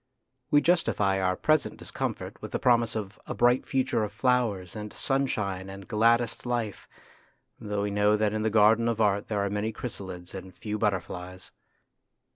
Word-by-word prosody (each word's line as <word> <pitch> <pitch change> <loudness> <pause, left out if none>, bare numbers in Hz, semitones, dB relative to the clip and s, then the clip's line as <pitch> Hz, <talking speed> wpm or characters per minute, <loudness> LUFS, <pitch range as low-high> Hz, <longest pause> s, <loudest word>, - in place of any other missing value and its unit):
We 145 -1 +5
justify 105 - +2
our 90 0 +1
present 155 +8 +1
discomfort - - -5
with - - -8
the - - +1
promise 120 -2 +3
of 105 -2 -5
a - - -4
bright 120 +1 +3
future 130 -4 +1
of 105 - -3
flowers 110 -6 0
and 105 -1 -6
sunshine 105 -9 -1
and 95 0 -9
gladdest 115 +1 +2
life, 120 -4 -3 0.7
though 105 -1 -2
we 100 - -1
know 105 +1 +3
that 105 0 +1
in 110 - -1
the 110 - +1
garden 110 +2 +4
of 115 -2 0
art 100 -2 +2
there 100 -2 0
are - - -1
many 105 +2 -1
chrysalides 95 -6 -7
and 95 -1 -8
few 105 -1 -4
butterflies. 95 -2 -3
105 Hz, 170 wpm, -28 LUFS, 100-115 Hz, 0.7 s, We